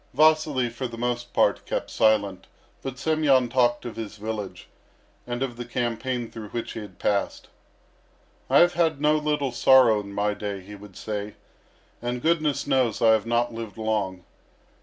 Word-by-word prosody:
Vasily, 155 -5 +3
for 120 +2 -4
the 115 -1 -9
most 120 0 -2
part, - - +2
kept - - -3
silent, 105 -4 +1 0.3
but 135 -2 -6
Semyon 140 -5 +2
talked 120 -1 +2
of 120 - -6
his 110 -2 -6
village, 105 -4 -6 0.6
and 120 +1 -2
of 120 -3 -4
the 120 - -4
campaign 120 0 -3
through 110 -2 -8
which 120 +2 -4
he - - -6
had 100 -4 -10
passed. 100 -1 -1 1.0
"I - - +5
have 175 0 +5
had 165 -4 +1
no 150 +1 +3
little 150 -3 -1
sorrow 120 -3 +5
in 100 -1 -8
my 105 +1 0
day," 100 -2 -5
he 100 +3 -12
would 100 -2 -12
say; 105 -1 -5 0.7
"and 120 +1 -2
goodness 155 0 +1
knows 125 -5 +1
I 115 -1 +5
have 110 0 +2
not 120 0 +1
lived 115 -1 -7
long. 105 -5 -2
120 Hz, 170 wpm, -25 LUFS, 105-130 Hz, 1.0 s, I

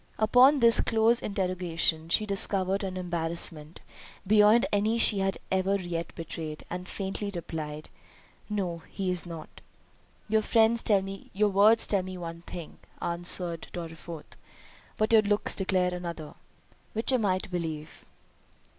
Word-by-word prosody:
Upon 250 +6 +5
this 230 -1 +7
close 225 +1 +2
interrogation 175 -4 -1
she 215 +5 +2
discovered 195 -1 +1
an 185 -1 -4
embarrassment, 165 -3 -1 0.4
beyond 210 +3 +5
any 210 +3 +1
she 215 -3 +3
had 195 0 0
ever 190 +1 +1
yet 170 -2 -5
betrayed, 160 -1 -7
and 180 +1 -5
faintly 195 +1 -4
replied, 155 -3 -6 0.6
"No, 185 -5 -3
he 190 -2 -2
is 180 -1 -3
not." 165 -2 -10 0.7
"Your 220 +1 +2 1.1
words 210 +3 +5
tell 200 -2 +1
me 185 0 -7
one 170 -1 -7
thing," 170 -3 -9 0.2
answered 170 0 -2
Dorriforth, 165 -1 -8 0.6
"but 215 +1 +1
your 220 - +8
looks 205 0 -1
declare 185 -2 0
another—which 175 - -5
am 250 -4 +2
I 185 -2 +2
to 190 - -8
believe?" 160 -4 -5
185 Hz, 125 wpm, -28 LUFS, 170-205 Hz, 1.1 s, your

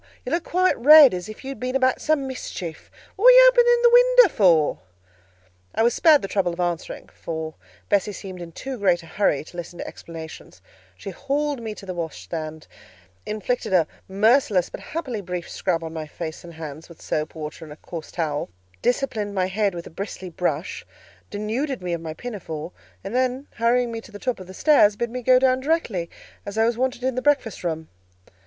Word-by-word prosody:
You - - -4
look 335 0 0
quite 370 +1 +2
red, 295 0 +9
as 180 +3 -5
if 215 - -10
you 265 - -6
had 270 -5 -7
been 255 +2 -3
about 260 -1 +2
some 310 -3 +1
mischief: 180 -10 -6 0.3
what 420 - -2
were - - +11
you - - +9
opening 485 -1 +4
the 475 - +6
window - - +6
for?" 165 -7 +4 1.0
I - - +2
was 235 0 +3
spared 310 -3 +5
the - - -2
trouble 190 -3 0
of 170 - -10
answering, 175 -2 -3
for 160 -1 -5 0.3
Bessie 205 +1 +1
seemed 190 -2 -8
in 170 -1 -8
too 260 +8 -6
great 180 -4 +2
a - - -12
hurry 165 -4 0
to 175 - -14
listen 175 0 -7
to - - -5
explanations; 160 -1 -10 0.4
she - - -7
hauled 280 -1 -2
me 220 -2 -5
to 200 - -11
the 185 - -5
washstand, 160 -2 -6 0.6
inflicted 215 +1 -2
a 175 -3 +5 0.2
merciless, 205 -2 +2
but - - -7
happily 265 -9 -5
brief 180 -2 -5
scrub 170 -3 -2
on 160 0 -6
my 155 -1 -5
face 160 +1 -7
and 170 -1 -11
hands 155 0 -8
with 170 - -14
soap, 155 +1 -3
water, 155 0 -7
and 155 - -11
a - - -8
coarse 160 +1 -9
towel; 155 -4 -2 0.3
disciplined 230 -5 -1
my 185 -1 +1
head 195 0 0
with 170 - -6
a - - -11
bristly 190 0 -6
brush, 165 -1 -2 0.5
denuded 225 +4 -3
me 175 -1 -2
of 170 - -3
my 160 -1 -6
pinafore, 175 -9 -6 0.3
and 195 +3 -6
then 255 +2 0
hurrying 235 +1 +2
me 225 0 -5
to 225 - -15
the 205 - -8
top 250 +2 -2
of 185 - -10
the 185 - -10
stairs, 215 -8 +5
bid 235 +2 -3
me 250 +1 -4
go 255 +1 +5
down 255 0 +3
directly, 260 - -1 0.3
as 200 +1 -7
I 225 - +4
was 235 0 +1
wanted 255 0 -2
in 260 0 +1
the 255 - -2
breakfast 275 -9 +1
room. 160 -2 -3
205 Hz, 205 wpm, -23 LUFS, 170-255 Hz, 1.0 s, were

